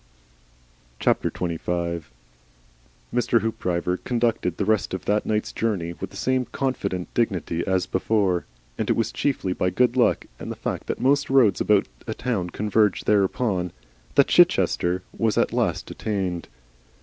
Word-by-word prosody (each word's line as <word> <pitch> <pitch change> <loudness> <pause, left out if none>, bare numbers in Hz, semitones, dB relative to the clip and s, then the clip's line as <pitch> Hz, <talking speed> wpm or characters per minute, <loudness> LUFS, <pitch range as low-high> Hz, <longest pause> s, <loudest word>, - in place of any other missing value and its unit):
XXV. 85 -2 0 1.5
Mr. 120 -1 +2
Hoopdriver 90 -5 -1
conducted 115 -7 0
the 100 - 0
rest 110 -2 +1
of 95 - -7
that 105 +1 +1
night's 105 0 0
journey 95 -7 -1
with - - -7
the 100 - -11
same 130 +2 +1
confident 100 -11 -3
dignity 95 -7 0
as 95 -1 +1
before, 95 -2 +1 0.3
and - - -1
it - - +3
was 115 -1 0
chiefly 130 -10 -1
by 90 - 0
good 125 +6 +2
luck 125 - +3
and - - -6
the - - -4
fact - - -4
that - - -2
most 140 +2 +2
roads 125 -8 +4
about 105 -2 +3 0.2
a 110 - -3
town 110 -8 -2
converge 105 +1 +1
thereupon, 100 -2 +1 0.4
that - - +6
Chichester 90 +1 +3
was 110 -2 +1
at - - +2
last - - -1
attained. 95 -5 -3
105 Hz, 145 wpm, -24 LUFS, 90-115 Hz, 1.5 s, that